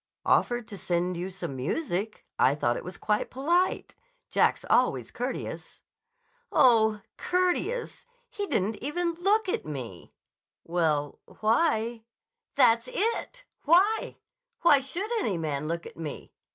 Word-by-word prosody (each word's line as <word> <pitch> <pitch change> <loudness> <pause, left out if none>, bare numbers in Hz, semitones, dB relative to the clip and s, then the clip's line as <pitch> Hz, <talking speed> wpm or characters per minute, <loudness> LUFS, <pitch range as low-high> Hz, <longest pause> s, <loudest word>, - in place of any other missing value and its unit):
"Offered 240 -2 +2
to 200 - -8
send 175 +1 -1
you 175 +2 -4
some 180 -7 -6
music. 195 - -3
I 135 - +4
thought 120 -5 +1
it - - -5
was 180 0 -7
quite 210 -1 0
polite. 340 +8 0 0.4
Jack's - - +2
always - - +2
courteous." - - -5 0.7
"Oh, 220 -4 +4 0.2
courteous! 365 +9 -1 0.2
He 410 -1 -5
didn't 210 - 0
even 340 +4 -1
look 395 +5 +1
at - - -1
me." 125 - -7 0.5
"Well, 155 -4 0 0.2
why—" 230 -1 +1 0.5
"That's 230 +2 +4
it! 465 +3 -2 0.2
Why? 375 +8 +3 0.4
Why 295 -5 +6
should 345 - -4
any 200 - -1
man 150 -2 -2
look 170 +1 -3
at - - -11
me? 160 -3 -7
225 Hz, 125 wpm, -28 LUFS, -, 0.7 s, Why